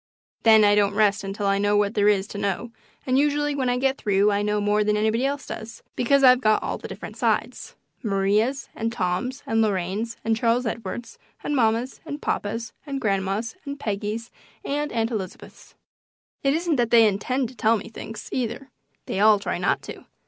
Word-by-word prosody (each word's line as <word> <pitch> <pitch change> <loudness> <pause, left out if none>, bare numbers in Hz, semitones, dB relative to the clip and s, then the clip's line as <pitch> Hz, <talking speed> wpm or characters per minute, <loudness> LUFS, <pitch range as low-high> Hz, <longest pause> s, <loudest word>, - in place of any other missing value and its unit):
Then 220 -1 +6
I 205 0 +5
don't 205 -1 +2
rest 210 -1 +2
until 195 +1 -4
I 195 0 +2
know 205 0 +2
what 205 0 +1
there 205 -2 +2
is 200 -2 +2
to 205 - -6
know, 200 +4 -2 0.3
and 260 +1 +2
usually 295 0 +1
when 265 -3 0
I 245 - +1
get 270 +1 0
through 205 0 +2
I 200 0 +1
know 210 0 0
more 205 +1 +2
than 210 0 +1
anybody 220 +5 +1
else 285 0 -3
does, 225 +1 -8
because 275 +3 +3
I've 255 -1 +7
got 215 -3 +3
all - - -3
the - - -7
different - - -9
sides - - -1 0.3
Maria's 210 +6 +1
and 225 +1 -2
Tom's 235 +6 -2
and 225 0 +1
Lorraine's 205 +2 -1
and 225 0 +2
Charles 235 +2 +1
Edward's 230 +1 -5 0.2
and 295 - -1
mamma's 235 +1 +1
and 295 -2 -6
papa's 225 -3 -3
and 275 -2 -4
grandma's 200 - -1
and 280 -1 -6
Peggy's 210 +2 -3 0.3
and 295 +1 -2
Aunt 225 0 -1
Elizabeth's. 195 -5 -7 0.7
It 275 +1 +2
isn't 330 -2 0
that 240 -2 +1
they 230 -1 +7
intend 240 +5 -1
to 255 - -14
tell 225 +1 +3
me 215 - -8
things, 225 0 -8
either; 260 +2 -3 0.3
they - - -3
all 215 0 +6
try 200 - -3
not - - 0
to. - - -9
225 Hz, 195 wpm, -24 LUFS, 205-255 Hz, 0.7 s, I've